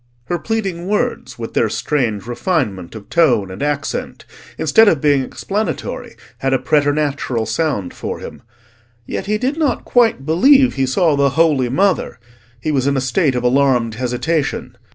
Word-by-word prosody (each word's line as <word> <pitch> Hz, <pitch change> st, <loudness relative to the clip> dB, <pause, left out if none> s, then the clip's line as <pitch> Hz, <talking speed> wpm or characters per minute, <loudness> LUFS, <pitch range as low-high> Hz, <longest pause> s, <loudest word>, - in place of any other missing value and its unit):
Her 175 Hz, +6 st, -2 dB
pleading 195 Hz, -6 st, -3 dB
words, 220 Hz, +4 st, -2 dB
with 115 Hz, -1 st, -6 dB
their 115 Hz, -, +2 dB
strange 115 Hz, -5 st, -1 dB
refinement 120 Hz, -, -2 dB
of 105 Hz, -2 st, -10 dB
tone 120 Hz, -, +2 dB
and 95 Hz, -, -8 dB
accent, 145 Hz, 0 st, -3 dB, 0.3 s
instead 215 Hz, +9 st, +4 dB
of 165 Hz, -7 st, +4 dB
being 145 Hz, -1 st, +3 dB
explanatory, 205 Hz, +10 st, -4 dB, 0.2 s
had 135 Hz, 0 st, 0 dB
a -, -, +4 dB
preternatural 145 Hz, -3 st, 0 dB
sound 110 Hz, -, -2 dB
for -, -, -5 dB
him. -, -, -10 dB, 0.6 s
Yet -, -, -5 dB
he 210 Hz, +1 st, +1 dB
did 260 Hz, +7 st, -1 dB
not 295 Hz, -7 st, 0 dB
quite 230 Hz, -, +2 dB
believe 260 Hz, -, +5 dB
he 135 Hz, -1 st, 0 dB
saw 155 Hz, +3 st, +2 dB
the 140 Hz, 0 st, +3 dB
Holy 140 Hz, -3 st, +2 dB
Mother: 185 Hz, 0 st, 0 dB, 0.4 s
he 155 Hz, -, -2 dB
was 135 Hz, -2 st, +1 dB
in 140 Hz, -1 st, +1 dB
a -, -, +2 dB
state 130 Hz, +2 st, +1 dB
of 125 Hz, -, -1 dB
alarmed 125 Hz, -3 st, +2 dB
hesitation. 125 Hz, +6 st, -2 dB
140 Hz, 160 wpm, -18 LUFS, 125-175 Hz, 0.6 s, believe